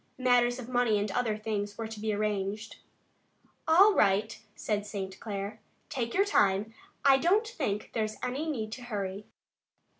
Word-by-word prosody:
Matters 245 -1 +3
of 250 -3 -7
money 245 -4 +2
and 205 0 -1
other 220 -1 0
things 205 -1 -3
were 225 - -3
to 220 -1 -8
be 215 0 -1
arranged. 210 0 -2 0.9
"All 385 +6 +7
right," 210 - +2
said 210 -2 -1
St. 195 -2 -6
Clair. 205 0 -5 0.3
"Take 235 -3 -3
your 395 +2 +4
time. 205 - +2 0.3
I 270 -1 +7
don't 400 - +3
think 265 - -3
there's 215 -1 -1
any 280 +6 -2
need 220 -7 -3
to 250 - -7
hurry." 205 -4 -4
220 Hz, 155 wpm, -29 LUFS, 205-250 Hz, 0.9 s, All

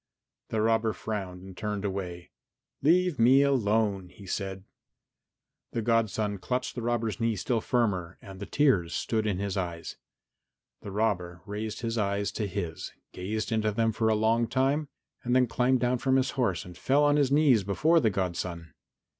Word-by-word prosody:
The 110 - 0
robber 115 0 +2
frowned 95 -3 -5
and 95 -1 -11
turned 105 0 -3
away. 90 -3 -5 0.5
"Leave 175 0 +3
me 130 +4 +6
alone," 105 -8 +1
he 100 +1 -14
said. 95 0 -4 1.1
The 115 - -1
godson 110 -3 +1
clutched 125 +6 -2
the 120 - -5
robber's 115 -1 -1
knee 115 -1 +1
still 115 +4 -1
firmer 95 -9 0
and 95 -2 -11
the 100 - -6
tears 105 - +2
stood 110 -2 -1
in 100 -4 0
his 100 0 -2
eyes. 85 -3 -4 0.8
The - - -7
robber 90 -4 -1
raised 105 +2 -5
his 115 -1 -2
eyes 100 0 0
to 105 - -2
his, 90 -4 -4 0.2
gazed 105 +5 -3
into 110 -1 +1
them 115 +2 +1
for 110 0 +1
a 110 - +3
long 115 +2 +2
time, 135 +5 +1 0.4
then 125 +1 +3
climbed 125 +1 +1
down 125 0 +1
from 130 +1 +2
his 135 0 +2
horse 115 - -1
and 90 0 -11
fell 140 +9 +2
on 145 0 +4
his 140 -2 +2
knees 140 -7 +4
before 155 - +3
the 115 - +3
godson. 90 -4 -3
110 Hz, 170 wpm, -28 LUFS, 95-125 Hz, 1.1 s, me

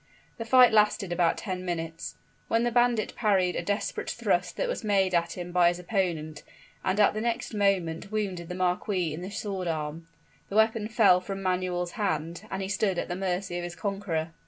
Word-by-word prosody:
The 230 - -3
fight 250 +1 +7
lasted 210 -3 +3
about 175 -1 +2
ten 185 -3 -4
minutes, 165 -2 -4 0.3
when 230 +1 +2
the 240 - +1
bandit 240 -2 +2
parried 190 -5 +2
a - - -1
desperate 200 +4 -2
thrust - - 0
that - - 0
was - - -3
made 195 -3 +2
at 170 0 +1
him 175 0 -5
by 175 -1 +5
his 175 0 +1
opponent, 170 -5 -2 0.4
and 190 +2 0
at 210 - +5
the 215 - -3
next 235 0 -2
moment 195 -3 0
wounded 190 -5 -3
the 180 - -4
marquis 180 -2 0
in 160 - -6
the 185 - -5
sword 195 -3 -4
arm. 160 0 -3 0.4
The 195 - -5
weapon 220 0 +3
fell 210 -5 +5
from 195 +1 -5
Manuel's 180 -1 -1
hand, 175 -2 -2
and 195 0 -3
he - - -3
stood 195 -1 0
at - - -2
the 175 - -2
mercy 185 -1 -2
of - - -5
his 175 0 -6
conqueror. 190 -6 -2
185 Hz, 200 wpm, -28 LUFS, 175-210 Hz, 0.4 s, fight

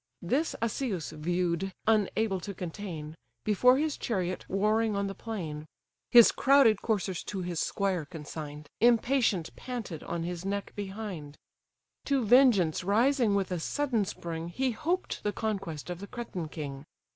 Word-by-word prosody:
This 275 - 0
Asius 220 - -2
view'd, 175 +3 -1
unable 215 -2 +2
to 200 +2 -6
contain, 165 -4 -6 0.3
Before 250 +5 +5
his 305 0 0
chariot 185 -5 -2
warring 215 +2 +2
on 200 0 0
the 195 - -3
plain: 160 -10 -5 0.4
(His 235 -2 +9
crowded 265 -7 +5
coursers, 195 -5 -1
to 190 -3 -4
his 175 -2 -3
squire 190 -5 0
consign'd, 150 -1 -8
Impatient 235 -6 +3
panted 235 -10 -6
on 170 -1 -3
his 175 0 -4
neck 200 +1 -3
behind:) 190 -7 -6 0.7
To 275 -4 +1
vengeance 210 - +5
rising 230 +2 +3
with 195 -2 0
a 180 - -1
sudden 250 - 0
spring, 165 -3 -5
He 255 +9 -1
hoped 335 +11 -2
the 210 - 0
conquest 195 -8 -3
of 175 - -5
the 200 - -7
Cretan 200 -9 -5
king. 140 -4 -6
200 Hz, 145 wpm, -29 LUFS, 170-225 Hz, 0.7 s, His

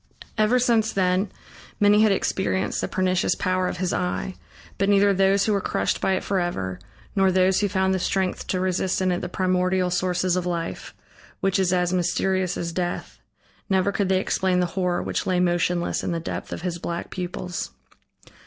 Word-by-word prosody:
Ever 215 +3 +3
since 235 -3 +2
then 185 +1 +1 0.5
many 210 +1 +5
had 215 -1 +5
experienced 190 -1 0
the - - -1
pernicious 185 -1 +1
power 185 0 0
of - - -3
his 180 -1 -1
eye, 180 +1 -2 0.5
but 195 +1 +2
neither 200 0 +5
those 195 +1 +3
who 215 - +2
were 200 - +1
crushed - - -1
by 190 - +2
it 185 - -1
forever, 175 - -2 0.4
nor 195 -1 +4
those 185 0 +3
who 205 - +1
found 190 0 +1
the 190 - 0
strength 190 +1 -1
to 185 - -1
resist 185 0 0
in 185 -1 +1
it 175 - -1
the - - -4
primordial 185 0 +1
sources 180 0 +1
of 180 -1 -1
life, 170 -1 -4 0.4
which 195 0 +1
is 185 -2 +2
as 180 -1 +1
mysterious 185 +1 0
as 170 -1 -3
death, 175 0 -4 0.5
never 190 0 +2
could 200 -2 -1
they 190 -1 +3
explain 185 -1 +1
the 180 - +2
horror 180 -2 0
which - - -2
lay 185 -1 +2
motionless 175 0 +1
in - - -2
the 170 - -1
depth 165 - -5
of - - -5
his 175 -2 -3
black 170 0 -4
pupils. 180 -1 -4
185 Hz, 190 wpm, -24 LUFS, 180-190 Hz, 0.5 s, many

